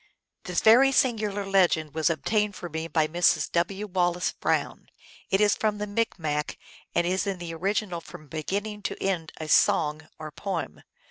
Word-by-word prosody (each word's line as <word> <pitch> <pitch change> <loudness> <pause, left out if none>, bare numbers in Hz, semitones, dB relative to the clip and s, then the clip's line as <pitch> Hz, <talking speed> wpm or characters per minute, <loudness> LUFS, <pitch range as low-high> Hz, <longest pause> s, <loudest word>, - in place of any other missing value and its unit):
This 180 -2 -1
very 250 +5 +6
singular 215 -6 +1
legend 175 -6 +2
was 160 +1 +1
obtained 210 +5 0
for 175 -1 -7
me 160 +1 -4
by 160 -1 +2
Mrs. 175 +3 +2
W. 190 +4 -1
Wallace 180 -2 0
Brown. - - -2 0.4
It 195 - +2
is 210 -1 +4
from 215 -1 -1
the 210 - -3
Micmac, 165 -9 -2 0.4
and 170 - +2
is 185 +3 0
in 195 -2 -2
the 170 -2 -6
original 185 0 -2
from 155 -2 -12
beginning 200 +8 -4
to 190 - -4
end 175 -5 -2
a 155 - -6
song, 155 0 +2
or 155 -1 -8
poem. 165 - -5
180 Hz, 170 wpm, -26 LUFS, 160-205 Hz, 0.4 s, very